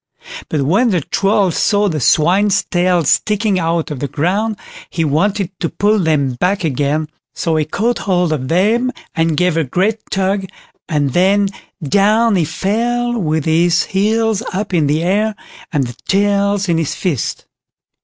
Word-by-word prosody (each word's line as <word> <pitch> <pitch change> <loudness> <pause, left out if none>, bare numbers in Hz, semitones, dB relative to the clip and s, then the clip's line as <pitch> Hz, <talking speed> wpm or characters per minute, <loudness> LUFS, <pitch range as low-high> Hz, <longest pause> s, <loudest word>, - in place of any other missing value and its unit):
But 150 -3 0
when 200 - +2
the 180 -6 +1
Troll 195 +4 +1
saw 205 +5 +1
the 160 -5 -2
swine's 195 - +3
tails 175 -4 +1
sticking 210 +1 +1
out 165 -2 -1
of 145 - -5
the 145 - -2
ground 190 - -1 0.3
he 165 -2 -1
wanted 190 +6 0
to 165 - -1
pull 210 +1 +1
them 150 -6 +1
back 190 +1 0
again, 150 +1 -1 0.3
so 165 -2 -1
he 155 -1 +1
caught 225 +10 -1
hold 180 -4 0
of 130 -4 -3
them 220 - +2 0.2
and 165 -2 0
gave 180 -2 +1
a 165 - +2
great 190 - 0
tug, 195 0 -1 0.4
and 145 -5 0
then 195 +2 +3 0.4
down 210 +5 +3
he 175 -4 +2
fell 235 +9 -1
with 155 -4 -1
his 170 +2 +3
heels 220 +2 0
up 200 +1 -4
in 160 -4 +2
the 155 +3 0
air, 210 +4 +1 0.4
and 145 -5 0
the 120 -1 -8
tails 200 0 +1
in 165 -2 +1
his 160 - -2
fist." 165 - -3
185 Hz, 165 wpm, -16 LUFS, 160-205 Hz, 0.4 s, swine's